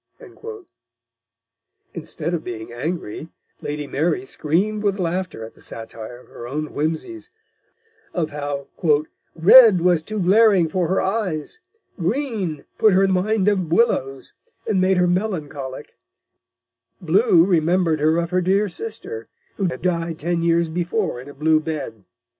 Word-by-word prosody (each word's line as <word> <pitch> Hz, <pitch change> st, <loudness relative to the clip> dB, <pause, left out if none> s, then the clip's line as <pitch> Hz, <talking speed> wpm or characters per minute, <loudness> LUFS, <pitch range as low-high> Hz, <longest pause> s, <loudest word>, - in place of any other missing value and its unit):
Instead 165 Hz, 0 st, -4 dB
of 170 Hz, -, -2 dB
being 115 Hz, -1 st, -7 dB
angry, 160 Hz, +1 st, -4 dB, 0.3 s
Lady 150 Hz, 0 st, -4 dB
Mary 170 Hz, -, -1 dB
screamed 205 Hz, -, -1 dB
with 200 Hz, -1 st, 0 dB
laughter 180 Hz, -, -3 dB
at 110 Hz, -, -12 dB
the -, -, -20 dB
satire 115 Hz, +1 st, -8 dB
of 125 Hz, -, -18 dB
her 120 Hz, -, -9 dB
own 150 Hz, +4 st, -3 dB
whimsies, 160 Hz, -, -3 dB, 0.8 s
of 160 Hz, -3 st, -2 dB
how 145 Hz, -1 st, -4 dB, 0.7 s
"Red 200 Hz, +3 st, +8 dB
was 175 Hz, -2 st, +3 dB
too 215 Hz, +6 st, -5 dB
glaring 195 Hz, -2 st, +4 dB
for 175 Hz, +1 st, 0 dB
her 190 Hz, +3 st, +1 dB
eyes; 190 Hz, -, -2 dB, 0.4 s
Green 195 Hz, -, -2 dB
put 215 Hz, -3 st, +5 dB
her 190 Hz, +1 st, +4 dB
in 195 Hz, -, +2 dB
Mind 195 Hz, +2 st, +1 dB
of 190 Hz, -6 st, +1 dB
Willows, 135 Hz, -, +1 dB, 0.3 s
and 190 Hz, -3 st, +1 dB
made 185 Hz, 0 st, +3 dB
her 180 Hz, -, +4 dB
melancholic; 155 Hz, -8 st, -3 dB, 1.1 s
Blue 180 Hz, 0 st, +4 dB
remembered 170 Hz, -2 st, +2 dB
her 155 Hz, +2 st, +3 dB
of 170 Hz, 0 st, -1 dB
her 185 Hz, 0 st, +2 dB
dear 195 Hz, +4 st, +2 dB
Sister, 190 Hz, -, -7 dB, 0.3 s
who 195 Hz, -, 0 dB
had 165 Hz, -5 st, -3 dB
died 170 Hz, -2 st, -1 dB
ten 170 Hz, +2 st, -1 dB
Years 170 Hz, 0 st, +2 dB
before 175 Hz, -, -2 dB
in 135 Hz, -, -11 dB
a -, -, -10 dB
blue 155 Hz, +2 st, +3 dB
Bed." 150 Hz, -, -5 dB
170 Hz, 140 wpm, -22 LUFS, 155-190 Hz, 1.1 s, Red